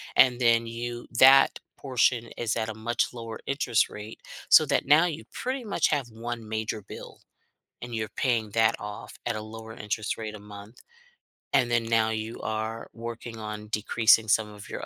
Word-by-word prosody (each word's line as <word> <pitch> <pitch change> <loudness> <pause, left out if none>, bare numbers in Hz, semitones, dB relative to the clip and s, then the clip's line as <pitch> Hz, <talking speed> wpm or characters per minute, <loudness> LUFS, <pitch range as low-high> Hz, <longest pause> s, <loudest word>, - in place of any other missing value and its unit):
and 125 -2 +5
then 115 -1 +3
you 120 +1 -6
that 135 +1 +7 0.2
portion 125 -3 +1
is 115 -2 -1
at 110 0 -2
a - - -4
much 120 +3 -1
lower 115 -2 -7
interest 135 -4 +1
rate 105 +1 -9 0.3
so - - +8
that - - +1
now 155 +4 +6
you 165 -2 -4
pretty 255 +1 -3
much 205 -7 +1
have 140 -5 -1
1 115 0 -6
major 110 -1 -3
bill, - - -11 0.6
and 120 -1 -6
you're 110 -1 -2
paying 115 -5 0
that 110 +1 +3
off 105 0 -8
at 120 -2 -1
a - - -4
lower 110 +1 -9
interest 110 +1 -3
rate 110 -1 -5
a - - -8
month. 105 +2 -12 0.7
And 120 -1 +3
then 115 -1 +2
now 115 -1 +2
you 110 +1 -4
are 110 +1 -4
working 115 0 -7
on 105 0 -6
decreasing 110 +1 +3
some 105 0 +2
of 105 -1 -12
your - - -5
115 Hz, 180 wpm, -27 LUFS, 110-120 Hz, 0.7 s, so